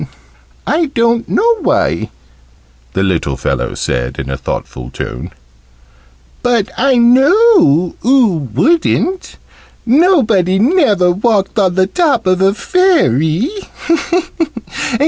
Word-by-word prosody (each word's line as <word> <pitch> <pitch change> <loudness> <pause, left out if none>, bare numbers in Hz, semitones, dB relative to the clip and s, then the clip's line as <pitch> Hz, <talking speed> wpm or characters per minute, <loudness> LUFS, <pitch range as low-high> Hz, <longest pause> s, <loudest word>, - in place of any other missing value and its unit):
"I 325 +1 0
don't 235 -3 0
know 465 0 +2
why," 80 - -1 0.8
the 95 - -1
little 85 -8 -1
fellow 65 -2 -3
said 60 +2 -3
in 65 0 -5
a - - -2
thoughtful 60 -1 -6
tone. - - -7 1.1
"But 235 -4 0
I 265 +1 +1
know 250 - +3
oo 220 - +1
wouldn't. 335 - 0 0.5
Nobody 230 - +2
never 215 - +2
walked 205 +2 0
on 185 -3 +1
the 190 0 +2
top 285 - 0
of 185 0 +1
a 195 +1 +2
Fairy. 220 - +1
215 Hz, 105 wpm, -14 LUFS, -, 1.1 s, know